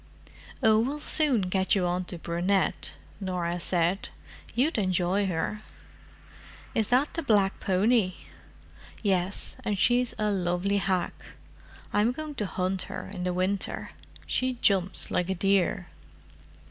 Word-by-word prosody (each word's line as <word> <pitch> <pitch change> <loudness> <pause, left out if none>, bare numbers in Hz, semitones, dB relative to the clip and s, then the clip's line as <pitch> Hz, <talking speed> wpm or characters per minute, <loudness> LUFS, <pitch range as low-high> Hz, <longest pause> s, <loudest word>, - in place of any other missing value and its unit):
"Oh, 220 -1 +6
we'll 275 +6 -1
soon 295 -6 +3
get 190 +1 +1
you 190 -2 +1
on 180 +1 -1
to 175 - -7
Brunette," 175 +4 0 0.3
Norah 180 -3 -2
said. 175 +2 0 0.5
"You'd 260 +1 +2
enjoy 185 +1 +1
her." 185 +4 -2 1.1
"Is 220 -2 +1
that 260 +4 +2
the 330 - -1
black 205 -8 +2
pony?" 195 0 +2 0.9
"Yes—and 200 +3 -1
she's 245 +5 +2
a 210 -1 +1
lovely 185 +1 0
hack. 185 -3 0 0.8
I'm 215 +4 +3
going 310 +2 -6
to 205 - 0
hunt 185 0 -1
her - - -6
in 180 -2 -4
the 180 - +1
winter: 185 +2 -1 0.3
she 255 0 0
jumps 195 -6 +1
like 180 +1 0
a 190 - 0
deer." 195 -1 +1
195 Hz, 130 wpm, -28 LUFS, 180-220 Hz, 1.1 s, Oh